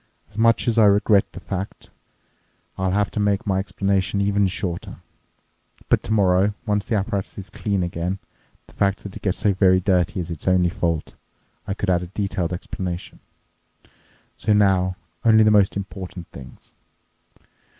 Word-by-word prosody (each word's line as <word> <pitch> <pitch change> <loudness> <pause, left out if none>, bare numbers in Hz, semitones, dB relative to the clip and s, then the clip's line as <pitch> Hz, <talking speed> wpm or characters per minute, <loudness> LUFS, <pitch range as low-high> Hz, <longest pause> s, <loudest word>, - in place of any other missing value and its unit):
As - - -16
much 115 +1 +3
as 115 -1 +2
I 110 - +7
regret 100 0 +4
the - - -9
fact, 95 0 -6 0.8
I'll 95 0 -1
have 100 +2 +1
to - - -3
make 100 -1 +1
my 95 -2 +1
explanation 100 0 0
even 100 0 +2
shorter. 90 -2 -4 0.9
But - - +3
tomorrow, 100 -1 +2
once 105 -2 -1
the 115 - 0
apparatus 100 -1 -2
is 95 -2 -8
clean 100 -3 -1
again—the 90 +2 -7
fact 100 0 0
that 100 - -8
it - - -8
gets 95 -3 0
so 105 -1 +2
very 95 -1 +4
dirty 90 -1 +1
is 85 -1 -4
its 85 - -6
only 90 -1 +4
fault—I 85 +3 -5
could 100 -2 -1
add 90 -1 +2
a 90 - -6
detailed 95 -2 -2
explanation. 90 0 -5 1.2
So 105 - +1
now, 95 -3 +3 0.3
only 110 -1 +6
the 110 - +5
most 100 -2 +3
important 95 -2 -7
things. 65 -2 -13
95 Hz, 155 wpm, -22 LUFS, 90-105 Hz, 1.2 s, I